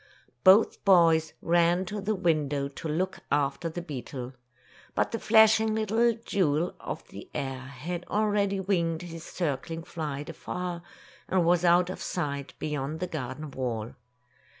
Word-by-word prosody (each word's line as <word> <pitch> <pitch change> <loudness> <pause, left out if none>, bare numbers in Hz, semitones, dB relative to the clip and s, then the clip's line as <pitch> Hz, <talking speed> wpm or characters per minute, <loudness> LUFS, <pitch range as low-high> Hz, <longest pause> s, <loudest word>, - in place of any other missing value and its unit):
Both 195 +4 +6
boys 165 -4 +5
ran 175 +2 +3
to 205 +2 -4
the 210 +2 0
window 150 -6 +1
to 140 +3 -7
look 185 +5 -1
after 145 +3 +1
the 170 +2 -6
beetle. 130 -4 -6 0.6
But - - +1
the 230 - -2
flashing 220 0 +5
little 225 +2 +2
jewel 170 -2 +1
of - - -6
the - - -10
air 135 -1 -3
had 145 +7 -6
already 205 -2 +1
winged 170 -4 0
his 165 -2 -8
circling 165 0 -3
flight 150 -4 -5
afar, 175 +1 -5 0.5
and 185 -2 +2
was 175 0 +3
out 175 +1 +4
of - - -7
sight, 140 -5 -3
beyond 150 +1 -3
the 180 - -1
garden 150 -2 -5
wall. 120 -4 -3
170 Hz, 145 wpm, -28 LUFS, 145-185 Hz, 0.6 s, Both